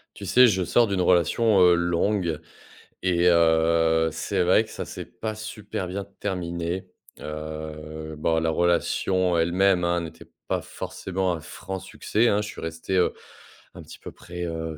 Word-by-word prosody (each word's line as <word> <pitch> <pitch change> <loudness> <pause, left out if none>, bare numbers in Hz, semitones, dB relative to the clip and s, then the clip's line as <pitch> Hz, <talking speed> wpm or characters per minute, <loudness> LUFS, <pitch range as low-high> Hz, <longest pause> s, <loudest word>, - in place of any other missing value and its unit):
Tu 100 - -8
sais, 125 +6 +6
je 95 -4 +1
sors 115 +7 +3
d'une 100 -2 -1
relation, 90 +4 +3
heu, 90 -1 +7
longue 85 0 0 0.6
et 90 -1 +2
heu, 80 -1 +3
c'est - - -1
vrai 90 +5 +5
que 110 - -15
ça - - -5
c'est - - -8
pas 110 -1 -2
super 105 -3 -6
bien 100 +2 -4 0.2
terminé, 90 -1 -3 0.3
heu, 80 0 -7
bon 80 +2 +1
la 80 0 +1
relation 85 +2 +1
en 85 - +2
elle-même, 90 +2 +3
hein, 85 0 +1
n'était 80 - -10 0.2
pas - - 0
forcément, 95 -1 -3
un 85 - -4
franc 95 +5 -7
succès 115 +5 0
hein. 105 -1 +2
Je 105 - -5
suis 110 - -9
resté, 80 +3 -3
heu, 90 - +3 0.6
un - - -10
petit - - -12
peu - - -9
près, 90 0 -8
heu, 80 -1 -4
85 Hz, 170 wpm, -25 LUFS, 80-95 Hz, 0.6 s, heu